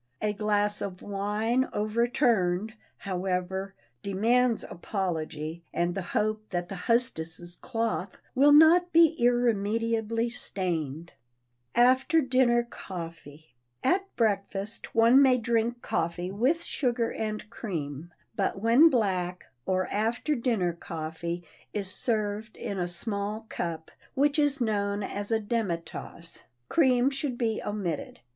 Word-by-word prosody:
A 210 -1 0
glass 210 0 0
of 185 -2 -5
wine 210 +5 0
overturned, 215 -3 +1 0.2
however, 190 +1 -3 0.3
demands 230 - +2
apology 165 -4 -4
and 175 0 0
the 195 - -3 0.2
hope 215 0 +1
that 175 -1 -3
the 195 - -5
hostess' 175 -8 -1
cloth 225 -6 -2 0.2
will 280 +3 +5
not 330 +4 +7
be 330 -1 +6
irremediably 230 -1 +1
stained. 170 - -3 0.6
[Sidenote: 245 +1 +7
AFTER 290 +5 +1
DINNER 255 -3 +3
COFFEE] 165 -6 -9 0.3
At 385 +2 +1
breakfast, 205 -1 -1
one 230 +4 +7
may 260 -2 +5
drink 235 0 0
coffee 175 +2 -2
with 265 +12 +1
sugar 240 -7 0
and 215 -1 -4
cream, 165 - -5 0.2
but 195 -2 -1
when 235 +10 +6
black, 185 - -1 0.2
or 185 0 +1
after 225 +8 0
dinner 230 -9 0
coffee 170 +1 -5 0.3
is 195 -3 -3
served 215 -1 -2
in 200 - -4
a 175 - 0
small 200 +4 -3
cup, 165 -2 -4 0.2
which 290 +2 +3
is 290 -2 +2
known 205 -3 0
as 205 +1 -4
a 225 -1 +2
demi 210 -5 -1
tasse, 170 0 -9 0.2
cream 260 -4 +4
should 275 -2 -3
be 225 -3 0
omitted. 190 -7 -4
210 Hz, 125 wpm, -28 LUFS, 180-240 Hz, 0.6 s, not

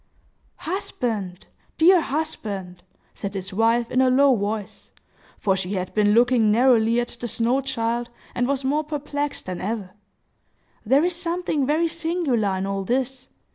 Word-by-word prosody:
"Husband! 225 - -4 0.3
dear 345 +2 +6
husband!" 200 - -4 0.3
said 200 0 -6
his 190 0 -5
wife, 230 +3 +2
in 255 - +3
a 260 - +4
low 270 +1 +5
voice,—for 205 -1 -4
she 190 +1 -3
had 185 -2 -3
been 210 -1 +3
looking 240 -2 +4
narrowly 235 0 +4
at 240 - -2
the 240 - -4
snow 240 +4 +1
child, 240 -2 -2 0.2
and 245 0 0
was 275 0 -1
more 290 +4 +1
perplexed 290 -1 -4
than 180 -1 -5
ever,—"there 210 - -4
is 360 -1 -1
something 340 -5 -1
very 315 +3 +2
singular 320 - 0
in 190 - -2
all 195 0 -2
this. 260 +4 -2
240 Hz, 140 wpm, -23 LUFS, 205-285 Hz, 0.3 s, dear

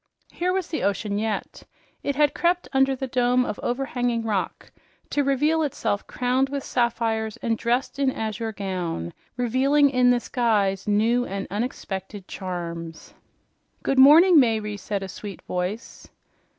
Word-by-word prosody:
Here 360 +1 -1
was 375 -2 -1
the 320 - -3
ocean 200 0 -1
yet. 215 -2 -3 0.4
It 280 - -2
had 295 0 +3
crept 355 +1 +1
under 270 0 +3
the 265 - -4
dome 250 0 +2
of 210 - -4
overhanging 245 -2 -1
rock 210 -4 -3 0.4
to 290 - +1
reveal 295 +4 +2
itself 260 -8 -2
crowned 255 +2 0
with 280 -1 -3
sapphires 225 -3 -1
and 230 -1 +1
dressed 245 +5 -1
in 275 -1 +3
azure 220 -1 -3
gown, 180 - -4 0.2
revealing 270 +4 +3
in 250 -1 +4
this 245 -1 +1
guise 205 -6 +1
new 225 +4 +2
and 195 0 -4
unexpected 200 -3 -5
charms. 170 -3 -6 0.7
"Good 270 - +1
morning, 320 +5 +8
Mayre," 220 -4 +1
said 200 -1 -4
a - - -5
sweet 200 +1 -8
voice. 180 +6 -5
235 Hz, 145 wpm, -24 LUFS, 205-270 Hz, 0.7 s, morning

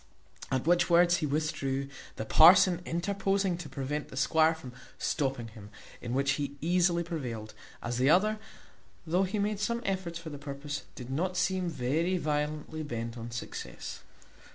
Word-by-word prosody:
At 130 0 0
which 175 +1 +3
words 175 0 +5
he 155 - -1
withdrew, 140 -2 -1 0.3
the 110 - -4
parson 180 - +7
interposing 195 +2 0
to 170 - -7
prevent 145 +2 -3
the 130 - -10
squire 160 +4 +4
from 130 -6 -10 0.2
stopping 135 -6 -1
him, 105 -2 -12 0.3
in 120 +1 -3
which 140 +1 +2
he 140 0 -3
easily 175 +2 +2
prevailed, 125 -11 -5 0.3
as 120 +1 -2
the 130 +2 +4
other, 215 +6 +4 0.7
though 180 +4 +2
he 195 +3 -3
made 205 0 0
some 235 +3 -1
efforts 185 -3 -2
for 165 -2 -8
the 145 - -7
purpose, 145 0 -5
did 125 0 -8
not 180 +6 -1
seem 185 0 +1
very 160 +6 0
violently 150 0 -2
bent 115 -5 -4
on 115 0 -6
success. 120 0 -6
155 Hz, 160 wpm, -30 LUFS, 135-180 Hz, 0.7 s, parson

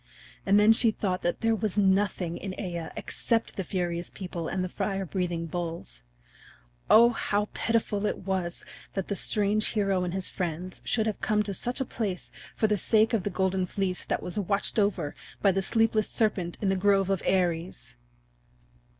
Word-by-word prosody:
And 200 +1 +6
then 215 +2 +7
she 225 +1 +4
thought 190 -4 -1
that 175 - -1
there 225 -1 +3
was 215 -2 -2
nothing 190 -3 +2
in 195 -2 -5
Aea 170 -4 -4
except 230 -1 -1
the 190 - -2
furious 175 -2 -2
people 180 -4 -5
and 185 -1 -1
the - - -1
fire 195 +1 -2
breathing 175 -2 -2
bulls. 165 - -5 0.9
O 235 +2 +8
how 210 -2 -1
pitiful 215 -2 0
it - - -1
was 185 -3 -2 0.3
that 195 -2 -3
the 200 - 0
strange 210 +2 +2
hero 195 -4 +1
and 180 - -2
his 190 0 -2
friends 180 0 -4
should 220 -2 +1
have 215 -2 -2
come 210 0 +2
to 200 -1 -4
such 245 +8 -2
a 265 - 0
place 205 -7 -4 0.2
for - - +1
the 210 -2 +2
sake 220 +5 +3
of 225 - +2
the 205 - -2
Golden 190 0 0
Fleece 185 -1 -1
that - - -1
was 180 +4 -3
watched 200 +3 0
over 195 -8 0 0.3
by 200 - +4
the 195 +1 0
sleepless 225 +1 +2
serpent 190 -6 0
in 195 - +2
the 190 - +2
grove 195 0 +3
of 195 - 0
Ares! 175 - -1
195 Hz, 185 wpm, -28 LUFS, 180-210 Hz, 0.9 s, O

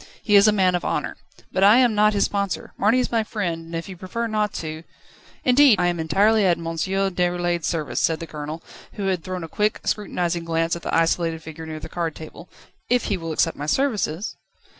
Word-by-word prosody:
He 210 - +3
is 200 +1 +7
a - - +6
man 190 -3 +2
of 175 - -1
honour. - - -2 0.4
But 190 - +1
I 205 +4 +7
am 250 -3 +4
not 210 0 +4
his 200 - +2
sponsor. 200 -2 -3
Marny 215 +5 +3
is 250 - -1
my 230 -2 +2
friend, 175 -7 -3
and 165 +1 -8
if 165 - -4
you 190 - -8
prefer 185 +6 -4
not 215 -2 0
to 155 -1 -5 0.3
..." - - -26
"Indeed 255 -4 +6
I 180 - +2
am 175 -1 -2
entirely 200 +7 +3
at 175 -3 +3
M. 170 - -8
Déroulède's 175 0 -1
service," 155 -6 -2
said 160 -1 +1
the 165 - -5
Colonel, 155 +1 -7 0.3
who 200 - -4
had 185 -4 -1
thrown 185 -2 -5
a - - -5
quick, 210 +6 0
scrutinising 175 -5 -1
glance 165 0 0
at 170 - -7
the - - -4
isolated 165 -1 +1
figure 160 0 -9
near 155 0 -6
the 155 - -8
card 165 -1 -3
table, 160 +2 -11 0.4
"if 245 0 +2
he - - 0
will 165 -2 -5
accept 165 +1 +1
my 145 - -6
services 215 - -1
180 Hz, 225 wpm, -23 LUFS, 165-210 Hz, 0.4 s, is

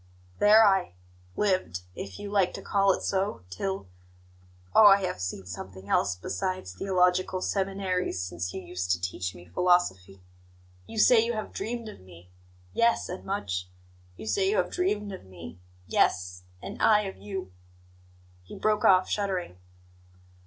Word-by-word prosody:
"There 215 +2 +7
I 195 - +2 0.4
lived, 185 - 0
if 95 0 -7
you 200 - -7
like 195 -3 +2
to - - -7
call 195 -1 +3
it - - -2
so, 190 - -1
till 190 - -3 0.9
oh, 215 - +8
I 200 -1 +6
have 95 - -4
seen 90 +1 -4
something 95 +2 -9
else 90 -3 +2
besides 95 - -4
theological 185 - +1
seminaries 190 - -1
since 90 0 -4
you 95 - -6
used 90 0 -5
to 85 - -2
teach 90 0 -4
me 90 - -13
philosophy! 95 - +1 0.6
You 225 - -9
say 225 +1 +6
you 235 +1 -1
have 215 -1 -5
dreamed 230 +2 -4
of 215 - -10
me 90 -1 -16 0.4
yes, 235 0 +2
and 180 +1 -6
much! 90 - -3 0.5
You - - -8
say 385 - +1
you 420 - +1
have - - +1
dreamed 210 - -1
of 190 - -8
me 90 -2 -11 0.3
yes, 90 +1 0 0.2
and - - -7
I 210 -1 +5
of 195 -2 -6
you 195 - -6 0.5
" 90 0 -29
He - - -10
broke 215 -1 +1
off, 185 -1 +5
shuddering. 185 - -2
180 Hz, 160 wpm, -28 LUFS, -, 0.9 s, oh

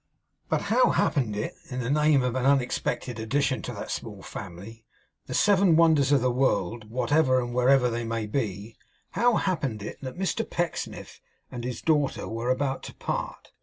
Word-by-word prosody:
But - - 0
how - - +5
happened 120 -8 +1
it 105 - -3 0.2
in 125 - -4
the 125 +1 -1
name 150 -2 +4
of 125 -1 0
an 130 -1 -1
unexpected 130 -3 0
addition 135 +4 0
to 125 - -5
that 100 - -6
small 105 -4 -6
family, 100 +5 -9 0.4
the - - -4
Seven 195 -4 +4
Wonders 155 -4 +4
of 140 -3 +4
the 125 0 +2
World, 115 -4 0
whatever 130 +3 +2
and 120 -1 -4
wherever 125 +1 +4
they 120 0 -2
may 115 -1 -2
be, 105 -2 -3 0.4
how 240 -1 +3
happened 135 - -1
it - - -7
that 130 +3 -7
Mr 190 +4 -1
Pecksniff 175 -1 -4 0.3
and 120 -1 -6
his 125 0 -5
daughter 150 -4 +1
were 115 +2 -3
about 135 +1 0
to - - -14
part? - - -4
125 Hz, 175 wpm, -26 LUFS, 115-145 Hz, 0.4 s, how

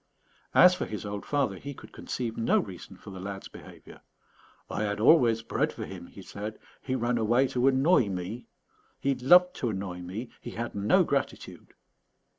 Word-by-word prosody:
As 180 0 +8
for 180 - -3
his 105 0 -6
old 100 0 -5
father, 135 -10 0
he 140 +7 -8
could - - -13
conceive 115 -3 -4
no 115 - +2
reason 95 -2 -5
for 100 - -11
the 95 - -8
lad's 95 +1 -6
behaviour. - - -14 0.7
"I - - -3
had 105 -1 -1
always 115 -3 +5
bread - - 0
for - - -6
him," 90 -2 -9
he 95 - -12
said; 105 +3 -7 0.2
"he 130 - -2
ran 120 -1 0
away 120 +4 +3
to 125 +1 +1
annoy 135 - +4
me. 95 +6 -5 0.5
He 140 - +1
loved 180 +8 +5
to 120 - -1
annoy 95 -3 -4
me. 100 +7 -6
He - - -7
had 120 +1 -4
no 100 +1 +3
gratitude." - - -4
115 Hz, 180 wpm, -28 LUFS, 100-130 Hz, 0.7 s, As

